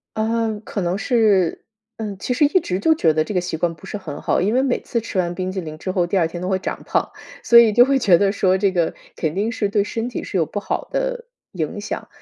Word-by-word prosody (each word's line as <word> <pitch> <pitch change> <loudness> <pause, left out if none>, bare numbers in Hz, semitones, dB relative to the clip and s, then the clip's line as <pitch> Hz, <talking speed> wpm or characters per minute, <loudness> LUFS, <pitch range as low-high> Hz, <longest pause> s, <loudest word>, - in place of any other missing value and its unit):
啊， 225 +1 0 0.2
可 210 - -5
能 175 0 -1
是 210 -7 +2 0.4
嗯， 210 -3 -5
其 250 - -2
实 290 +4 +3
一 365 +5 +3
直 185 +1 -2
就 320 +9 +3
觉 160 - +3
得 155 0 +1
这 210 - -5
个 180 - +1
习 175 -2 -4
惯 170 0 -1
不 155 - -15
是 - - -5
很 160 -7 -7
好， - - +1
因 205 +5 +1
为 255 - +3
每 265 -2 0
次 235 - -3
吃 200 -3 -3
完 175 -1 -1
冰 185 +1 -3
激 190 - -3
凌 155 -3 -7
之 185 +3 -4
后 180 -2 +1
第 195 - 0
2 170 - +3
天 175 +2 -5
都 180 - -3
会 190 -1 +1
长 190 - -5
胖。 - - 0 0.3
所 235 - +8
以 225 -3 +5
就 240 - +7
会 270 +1 +2
觉 190 -8 +5
得 200 +1 +2
说 190 -2 +2
这 195 0 +2
个 170 -3 0 0.2
肯 160 +1 -2
定 215 +4 0
是 210 -3 -1
对 200 0 +1
身 225 +3 -3
体 245 - -5
是 195 - -3
有 165 - +2
不 205 - -5
好 - - -3
的 - - -2 0.3
影 175 +3 -4
响。 215 - -5
200 Hz, 290 characters per minute, -21 LUFS, 175-230 Hz, 0.4 s, 所